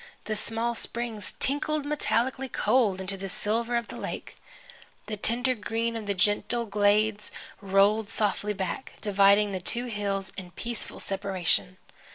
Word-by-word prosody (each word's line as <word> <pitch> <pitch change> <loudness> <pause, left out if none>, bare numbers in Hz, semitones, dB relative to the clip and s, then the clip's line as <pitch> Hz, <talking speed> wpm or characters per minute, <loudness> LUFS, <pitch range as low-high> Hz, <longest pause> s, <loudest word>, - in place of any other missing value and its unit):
The 215 +1 -2
small 225 +2 -1
springs 230 -3 -5
tinkled 290 +2 0
metallically 265 -3 0
cold 215 -4 +2
into 190 +1 +1
the 195 0 -5
silver 230 +5 0
of 235 -1 -1
the - - -7
lake. - - -6 0.7
The 215 - -4
tender 245 +5 +2
green 230 +1 -2
of 220 -2 -5
the 200 - 0
gentle 205 +5 +1
glades 210 +1 +2 0.3
rolled 200 +2 +3
softly 210 -1 0
back, 190 +3 -4
dividing 200 0 +4
the 190 - -2
two 235 +7 +1
hills 200 -4 -2
in 185 -2 -6
peaceful 235 -1 -2
separation. 190 - 0
210 Hz, 145 wpm, -27 LUFS, 200-235 Hz, 0.7 s, dividing